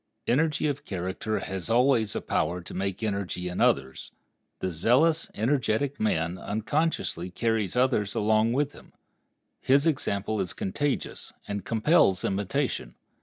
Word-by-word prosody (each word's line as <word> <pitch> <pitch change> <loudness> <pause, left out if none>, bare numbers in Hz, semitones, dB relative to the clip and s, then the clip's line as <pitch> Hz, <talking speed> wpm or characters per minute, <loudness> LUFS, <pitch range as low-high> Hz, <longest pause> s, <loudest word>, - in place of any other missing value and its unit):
Energy 150 +5 +1
of 145 -2 -1
character 95 +3 -3
has 95 +1 -4
always 120 -2 +3
a - - -1
power 85 +3 -1
to 85 - -10
make 95 +2 -3
energy 100 -4 -2
in 90 - -3
others. 65 -1 +1 0.5
The 95 - -3
zealous, 140 - +3
energetic 130 +3 0
man 85 -4 0
unconsciously 110 - -1
carries 110 +1 -1
others 125 -6 +1
along 110 +2 +2
with 145 +2 +1
him. - - -16 0.7
His 140 +3 +3
example 110 -9 0
is 90 - -2
contagious, 140 +9 -3
and 100 -2 -3
compels 110 - +3
imitation. 105 +8 -2
110 Hz, 130 wpm, -27 LUFS, 95-135 Hz, 0.7 s, always